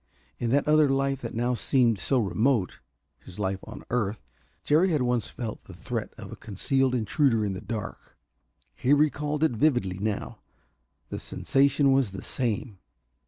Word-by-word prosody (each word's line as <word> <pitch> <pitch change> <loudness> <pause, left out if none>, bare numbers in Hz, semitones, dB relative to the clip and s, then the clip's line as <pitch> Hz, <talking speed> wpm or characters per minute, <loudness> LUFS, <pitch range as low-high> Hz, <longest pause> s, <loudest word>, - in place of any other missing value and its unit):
In 120 - -1
that 140 +4 +2
other 150 -1 +5
life 135 0 0
that 115 - -6
now 120 +2 +1
seemed 120 -3 +2
so 135 - +1
remote 110 -1 +1 0.4
his 90 - -13
life 95 -2 -1
on - - -9
earth 110 -3 -1 0.4
Jerry 160 +6 +3
had 150 -6 +1
once 125 -2 0
felt 115 -4 -6
the - - -12
threat - - -4
of - - -9
a - - -6
concealed 130 +5 0
intruder 115 0 +2
in 100 - -2
the 95 - -6
dark. 110 -3 -7 0.6
He 135 - +2
recalled 150 +1 +1
it 160 - +4
vividly 115 -7 +1
now. 105 0 -3 0.7
The - - -4
sensation 140 0 +2
was 135 -7 +2
the 95 - -7
same. 110 -4 -2
125 Hz, 165 wpm, -27 LUFS, 110-140 Hz, 0.7 s, other